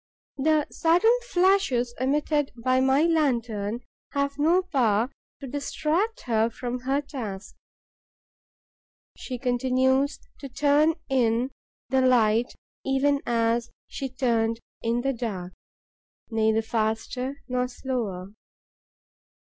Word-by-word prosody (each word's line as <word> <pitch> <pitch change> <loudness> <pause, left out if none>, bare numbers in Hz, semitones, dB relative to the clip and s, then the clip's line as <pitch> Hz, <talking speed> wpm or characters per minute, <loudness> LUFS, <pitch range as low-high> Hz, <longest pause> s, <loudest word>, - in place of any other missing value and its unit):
The 305 +2 +2
sudden 355 +8 +4
flashes 355 - +2
emitted 290 +2 +1
by 255 +2 +1
my 265 +3 +3
lantern 240 -9 0 0.3
have 280 0 -1
no 340 +5 +4
power 245 - +1 0.3
to 280 - -7
distract 315 - -1
her 225 -2 +1
from 245 +1 -4
her 270 +3 0
task. 215 -9 -7 1.6
She 255 - -6
continues 260 +3 +1 0.2
to 275 - -7
turn 290 +4 +3
in 245 -1 +1 0.4
the 265 +1 +3
light 235 -2 +3 0.3
even 275 +1 +2
as 235 0 +1 0.2
she 270 - -5
turned 230 -3 0 0.2
in 235 +1 0
the 270 +2 0
dark, 195 -7 -5 0.8
neither 220 0 +2
faster 230 +5 -2
nor 250 -1 0
slower. 220 -7 -4
255 Hz, 105 wpm, -26 LUFS, 230-285 Hz, 1.6 s, sudden